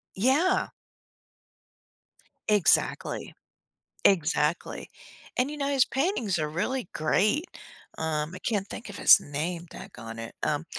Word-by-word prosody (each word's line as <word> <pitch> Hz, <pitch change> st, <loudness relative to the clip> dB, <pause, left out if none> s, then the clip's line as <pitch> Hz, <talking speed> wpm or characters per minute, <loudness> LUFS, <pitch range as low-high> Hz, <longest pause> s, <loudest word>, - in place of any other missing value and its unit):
Yeah! 275 Hz, -, +2 dB, 1.8 s
Exactly. 210 Hz, -4 st, +2 dB, 0.7 s
Exactly. 165 Hz, -3 st, +1 dB, 0.5 s
And, 255 Hz, +3 st, +1 dB
you 300 Hz, -, -6 dB
know, 280 Hz, -1 st, -1 dB
his 275 Hz, -3 st, +4 dB
paintings 265 Hz, -, -1 dB
are 155 Hz, -1 st, -1 dB
really 200 Hz, +7 st, -2 dB
great. 210 Hz, -, +1 dB, 0.5 s
Um, 155 Hz, 0 st, -2 dB
I -, -, -7 dB
can't 200 Hz, -1 st, -1 dB
think 230 Hz, -, -8 dB
of 205 Hz, -, -8 dB
his -, -, +8 dB
name, 165 Hz, +4 st, -4 dB
daggonit. 115 Hz, -, -8 dB
Um 150 Hz, +2 st, 0 dB
190 Hz, 110 wpm, -27 LUFS, 155-255 Hz, 1.8 s, his